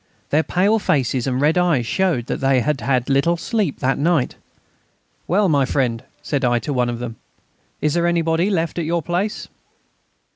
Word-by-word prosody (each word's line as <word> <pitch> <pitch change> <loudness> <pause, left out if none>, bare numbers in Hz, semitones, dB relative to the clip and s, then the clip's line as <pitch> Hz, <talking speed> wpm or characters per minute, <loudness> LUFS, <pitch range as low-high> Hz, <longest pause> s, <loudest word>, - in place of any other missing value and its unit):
Their 150 - +4
pale 200 +7 +1
faces 130 - 0
and 130 -1 0
red 155 +5 +3
eyes 165 -9 +2
showed 170 -4 0
that - - -3
they 135 -2 +2
had 150 +1 -1
had 125 -2 0
little 140 +5 +2
sleep 195 - -2
that 135 +1 +1
night. 155 -3 +1 0.9
"Well, 200 +3 +2
my 145 -5 +3
friend," 125 -3 -1 0.2
said 140 -2 -2
I 120 -1 +3
to 145 +5 -3
one 125 -2 +1
of 120 - -3
them, 115 -1 -6 0.6
"is 150 -1 +1
there 170 0 +1
anybody 170 +2 +1
left 170 -4 -1
at 165 - -2
your 170 0 -1
place?" 180 +6 -2
150 Hz, 180 wpm, -20 LUFS, 130-175 Hz, 0.9 s, Their